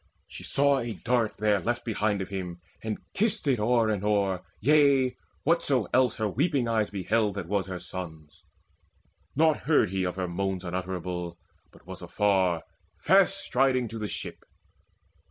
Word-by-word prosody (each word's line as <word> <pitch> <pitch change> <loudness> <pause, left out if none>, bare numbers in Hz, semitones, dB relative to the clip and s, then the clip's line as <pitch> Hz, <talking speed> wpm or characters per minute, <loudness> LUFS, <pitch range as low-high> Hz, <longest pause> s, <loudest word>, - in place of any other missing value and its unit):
She - - -10
saw 140 0 +2
a 115 -2 -3
dart 115 +2 0
there 105 -1 +2
left 120 +6 -2
behind 105 -3 0
of 95 - -10
him, 90 -3 -5 0.2
And 110 -1 -2 0.2
kissed 215 -4 +1
it 130 -5 +2
o'er 115 +1 +3
and 105 -2 -1
o'er 100 -3 +1 0.2
yea, 135 -1 +4 0.3
whatso 145 -7 +2
else 125 -2 +3
Her 110 - -1
weeping 135 - 0
eyes 110 -2 +1
beheld 105 +1 0
that 95 -4 -4
was 100 0 -1
her 95 -1 -4
son's. 80 -5 -8 0.9
Naught 160 +1 +4
heard 150 - +4
he 95 -1 -1
of 90 -1 -2
her 95 -1 -2
moans 95 +1 -2
unutterable, 90 -1 -4 0.3
But - - -20
was 95 0 -9
afar, 90 -2 +1 0.3
fast 195 - +4
striding 130 -4 +2
to 115 +1 -6
the 105 - -3
ship. - - -6
105 Hz, 160 wpm, -27 LUFS, 95-125 Hz, 0.9 s, yea